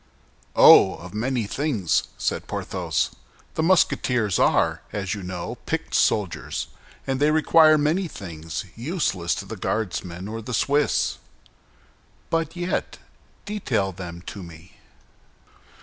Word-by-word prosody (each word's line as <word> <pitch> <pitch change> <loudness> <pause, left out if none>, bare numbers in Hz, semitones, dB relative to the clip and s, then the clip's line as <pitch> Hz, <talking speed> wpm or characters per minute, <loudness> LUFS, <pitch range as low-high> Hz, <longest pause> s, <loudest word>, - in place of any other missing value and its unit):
"Oh, - - +8
of 90 +1 -11
many 120 +1 -1
things!" 115 - 0
said - - -2
Porthos. - - -2 0.4
"The - - -1
Musketeers 125 - +2
are, - - +2
as 95 -1 -3
you 105 - -5
know, 90 -1 -5
picked - - -3
soldiers, 100 -6 0 0.4
and 135 -1 -1
they 145 +1 +4
require 155 0 +5
many 160 +6 +1
things 80 - -6
useless 115 - -1
to - - -6
the - - -7
Guardsmen 90 -3 -3
or 115 +1 -5
the 120 +2 -3
Swiss." 145 +5 +1 1.1
"But 165 0 0
yet, 175 +1 -2 0.5
detail 130 - -1
them 85 -2 -8
to 100 - -7
me." 85 0 -12
110 Hz, 120 wpm, -24 LUFS, 90-150 Hz, 1.1 s, Oh